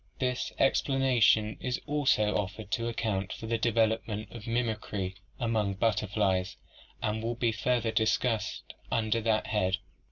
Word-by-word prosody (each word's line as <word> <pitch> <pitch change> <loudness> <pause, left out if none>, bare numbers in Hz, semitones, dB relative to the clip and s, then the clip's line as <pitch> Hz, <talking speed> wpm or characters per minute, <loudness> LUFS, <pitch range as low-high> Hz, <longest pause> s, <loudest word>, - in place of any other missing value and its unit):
This 125 -1 -1
explanation 130 -6 +3
is 125 -1 -2
also 130 -8 +2
offered 105 +1 -3
to 115 0 0
account 105 -5 -1
for - - -6
the 115 0 0
development 110 -1 +1
of 115 -1 -9
mimicry 110 -5 -1 0.3
among 110 -4 0
butterflies 100 -3 +1 0.5
and 110 -1 0
will 115 +1 -2
be 120 -1 +1
further 115 +1 0
discussed 110 0 0 0.2
under 115 0 +1
that 110 -1 +1
head 95 -4 0
(page - - +3
246). - - -28
110 Hz, 140 wpm, -30 LUFS, 105-120 Hz, 0.5 s, explanation